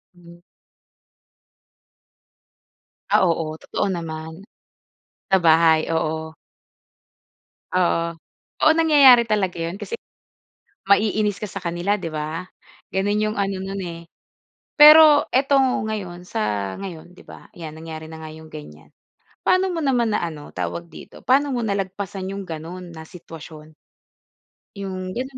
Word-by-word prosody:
Hmm. 175 Hz, 0 st, -17 dB, 2.7 s
Ah, -, -, +5 dB
oo, 160 Hz, -1 st, -2 dB
totoo 205 Hz, -, -2 dB
naman. 160 Hz, 0 st, -6 dB, 0.9 s
Sa 190 Hz, -, +5 dB
bahay? 160 Hz, -1 st, +4 dB
Oo. 160 Hz, 0 st, -2 dB, 1.4 s
Oo, 170 Hz, -2 st, +1 dB, 0.6 s
oo 310 Hz, -, +7 dB
nangyayari 285 Hz, -7 st, +7 dB
talaga 205 Hz, -5 st, -1 dB
yun 170 Hz, +4 st, -5 dB
kasi 465 Hz, -, -5 dB, 0.9 s
maiinis 210 Hz, 0 st, +2 dB
ka 210 Hz, -, -4 dB
sa 195 Hz, -1 st, -7 dB
kanila, 175 Hz, +4 st, -1 dB
'di 170 Hz, -5 st, -6 dB
ba? 155 Hz, +3 st, -4 dB, 0.5 s
Ganoon 205 Hz, +2 st, 0 dB
iyong 215 Hz, -1 st, -2 dB
ano 195 Hz, -1 st, -1 dB
nun 195 Hz, 0 st, -5 dB
eh. 170 Hz, -2 st, -6 dB, 0.7 s
Pero 300 Hz, 0 st, +8 dB
ito 275 Hz, +2 st, +2 dB
ngayon, 205 Hz, -8 st, -2 dB
sa 100 Hz, -, -2 dB
ngayon, 180 Hz, -2 st, -9 dB
'di -, -, -16 dB
ba? -, -, -14 dB
Ayan 160 Hz, -2 st, -9 dB
nangyari 160 Hz, 0 st, -8 dB
na 160 Hz, -, -9 dB
nga 155 Hz, -1 st, -9 dB
iyong 160 Hz, 0 st, -13 dB
ganyan. 150 Hz, -1 st, -12 dB, 0.6 s
Paano 375 Hz, +1 st, +3 dB
mo 335 Hz, -, -3 dB
naman 240 Hz, -5 st, +1 dB
na -, -, +1 dB
ano, 155 Hz, -3 st, -8 dB
tawag 170 Hz, 0 st, -5 dB
dito? -, -, -13 dB
Paano 275 Hz, +2 st, +2 dB
mo 240 Hz, -, -1 dB
nalagpasan 195 Hz, -2 st, -3 dB
iyong 200 Hz, 0 st, -5 dB
ganoon 170 Hz, +2 st, -8 dB
na 160 Hz, 0 st, -9 dB
sitwasyon? 155 Hz, -2 st, -12 dB, 1.0 s
Yung 185 Hz, -2 st, -5 dB
ganun 260 Hz, +1 st, -5 dB
185 Hz, 130 wpm, -22 LUFS, 160-210 Hz, 2.7 s, Pero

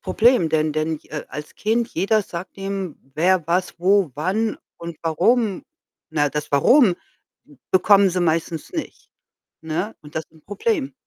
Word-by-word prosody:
Problem, 230 Hz, -7 st, +3 dB
denn 155 Hz, -1 st, +1 dB
denn 155 Hz, +1 st, -1 dB
ich -, -, -20 dB
äh, 150 Hz, -, -4 dB
als 150 Hz, +3 st, -8 dB
Kind, 225 Hz, +2 st, 0 dB
jeder 205 Hz, +5 st, +2 dB
sagt 180 Hz, 0 st, -8 dB
dem, 195 Hz, -4 st, -4 dB, 0.2 s
wer, 175 Hz, 0 st, +2 dB
was, 175 Hz, +1 st, -1 dB
wo, 190 Hz, -2 st, +3 dB
wann 200 Hz, +8 st, -1 dB, 0.2 s
und 170 Hz, -2 st, -8 dB
warum. 190 Hz, +6 st, +1 dB, 0.5 s
Na, 145 Hz, -2 st, +1 dB
das 150 Hz, +1 st, -4 dB
„Warum?“, 185 Hz, -, +5 dB, 0.7 s
bekommen 195 Hz, +1 st, +5 dB
sie 185 Hz, 0 st, -2 dB
meistens 165 Hz, -1 st, -1 dB
nicht, 325 Hz, -3 st, -6 dB, 0.5 s
ne, 160 Hz, +7 st, -3 dB
und 150 Hz, -1 st, -14 dB
das 160 Hz, -, -2 dB
ist -, -, -42 dB
'n 160 Hz, -, -21 dB
Problem. 290 Hz, -, -1 dB
180 Hz, 155 wpm, -22 LUFS, 155-205 Hz, 0.7 s, Warum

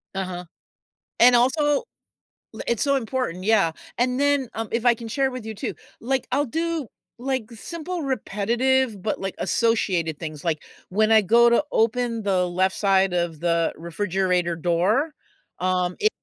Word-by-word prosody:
Uh-huh. 180 Hz, -2 st, -4 dB, 0.7 s
And 245 Hz, +1 st, +7 dB
also, 260 Hz, +6 st, +3 dB, 0.9 s
l -, -, -6 dB
it's 235 Hz, -4 st, +1 dB
so 280 Hz, -1 st, +2 dB
important, 235 Hz, -7 st, -2 dB
yeah. 200 Hz, -6 st, +3 dB, 0.3 s
And 250 Hz, +1 st, +1 dB
then, 285 Hz, -2 st, +2 dB
um, 225 Hz, -1 st, -3 dB
if 230 Hz, +1 st, -1 dB
I 240 Hz, -, +6 dB
can 230 Hz, 0 st, -8 dB
share 265 Hz, +3 st, 0 dB
with 250 Hz, -3 st, -7 dB
you 220 Hz, -, -5 dB
too, -, -, -4 dB, 0.3 s
like, 265 Hz, +1 st, -1 dB
I'll 285 Hz, +3 st, +2 dB
do, 325 Hz, 0 st, -2 dB, 0.3 s
like, 255 Hz, -3 st, -3 dB
simple 335 Hz, -, -6 dB
repetitive, 240 Hz, -1 st, 0 dB
but, 215 Hz, -, -2 dB
like, 195 Hz, -1 st, -4 dB
associated 185 Hz, -9 st, 0 dB
things, 155 Hz, -2 st, -7 dB
like, 160 Hz, -3 st, -1 dB, 0.3 s
when 215 Hz, +4 st, +2 dB
I 220 Hz, -1 st, +7 dB
go 235 Hz, +5 st, +5 dB
to 235 Hz, +5 st, +3 dB
open 230 Hz, 0 st, +1 dB
the 185 Hz, -3 st, +1 dB
left 185 Hz, +2 st, 0 dB
side 195 Hz, -2 st, +2 dB
of 170 Hz, -3 st, -1 dB
the 170 Hz, -1 st, +1 dB
refrigerator 180 Hz, 0 st, -1 dB
door, 180 Hz, -, +1 dB, 0.5 s
um, 180 Hz, -1 st, 0 dB
if 430 Hz, -, +4 dB
220 Hz, 160 wpm, -24 LUFS, 180-255 Hz, 0.9 s, And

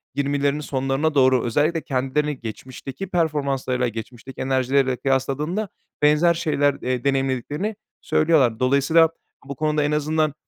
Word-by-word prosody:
20'lerinin 140 Hz, +1 st, 0 dB
sonlarına 135 Hz, +3 st, -1 dB
doğru 130 Hz, -3 st, +4 dB
özellikle 155 Hz, +7 st, +1 dB
kendilerini 135 Hz, +2 st, -1 dB
geçmişteki 130 Hz, -, -7 dB
performanslarıyla, 140 Hz, -7 st, 0 dB
geçmişteki 120 Hz, +3 st, -8 dB
enerjileriyle 130 Hz, 0 st, +1 dB
kıyasladığında 140 Hz, -, -1 dB, 0.3 s
benzer 150 Hz, +3 st, +4 dB
şeyler, 145 Hz, -3 st, +1 dB
eee, 125 Hz, -1 st, -2 dB
deneyimlediklerini 135 Hz, -, -1 dB, 0.3 s
söylüyorlar. 145 Hz, -8 st, +2 dB
Dolayısıyla 140 Hz, +5 st, +4 dB, 0.4 s
bu 140 Hz, -, -6 dB
konuda 150 Hz, 0 st, 0 dB
en 145 Hz, -, 0 dB
azından, 150 Hz, 0 st, 0 dB
140 Hz, 115 wpm, -22 LUFS, 130-150 Hz, 0.4 s, doğru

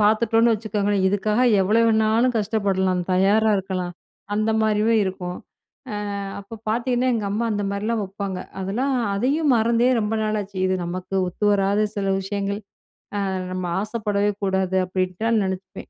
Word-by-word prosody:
பாத்துட்டோனு 225 Hz, +2 st, +4 dB
வச்சுக்கோங்களே 205 Hz, -1 st, -1 dB
இதுக்காக 210 Hz, +4 st, +1 dB, 0.2 s
எவ்வளோ 215 Hz, +5 st, +3 dB
வேணாலும் 225 Hz, +2 st, +3 dB
கஷ்டப்படலாம், 195 Hz, -4 st, 0 dB
தயாரா 200 Hz, +4 st, +3 dB
இருக்கலாம், 185 Hz, -2 st, -3 dB, 0.4 s
அந்த 215 Hz, +1 st, +1 dB
மாரியும் 220 Hz, +1 st, +2 dB
இருக்கும். 180 Hz, -1 st, -4 dB, 0.5 s
ஆ -, -, -3 dB, 0.4 s
அப்ப 220 Hz, +3 st, -10 dB
பாத்தெங்கன்னா 245 Hz, +2 st, +1 dB
எங்க 220 Hz, -3 st, -1 dB
அம்மா 215 Hz, +3 st, -1 dB
அந்த 205 Hz, 0 st, -1 dB
மாரிலாம் 215 Hz, +2 st, -1 dB
வப்பாங்க. 195 Hz, -1 st, -5 dB, 0.2 s
அதெல்லாம் 245 Hz, +9 st, -1 dB, 0.2 s
அதையும் 275 Hz, +7 st, +2 dB
மறந்தே 235 Hz, +2 st, +3 dB
ரொம்ப 210 Hz, +1 st, -1 dB
நாளாச்சு. 210 Hz, -2 st, -2 dB
இது 185 Hz, -, +1 dB
நமக்கு 185 Hz, +2 st, -5 dB
ஒத்துவராத 205 Hz, +2 st, +2 dB
சில 195 Hz, -1 st, -1 dB
விஷயங்கள். 200 Hz, +1 st, -3 dB, 0.7 s
ஆ -, -, -1 dB, 0.2 s
நம்ம 185 Hz, -1 st, -3 dB, 0.2 s
ஆசைப்படவே 210 Hz, -2 st, 0 dB
கூடாது 190 Hz, -1 st, +1 dB
அப்படின்டா 185 Hz, +4 st, -1 dB
நெனைப்பேன். 190 Hz, 0 st, -5 dB
205 Hz, 130 wpm, -23 LUFS, 190-220 Hz, 0.7 s, பாத்துட்டோனு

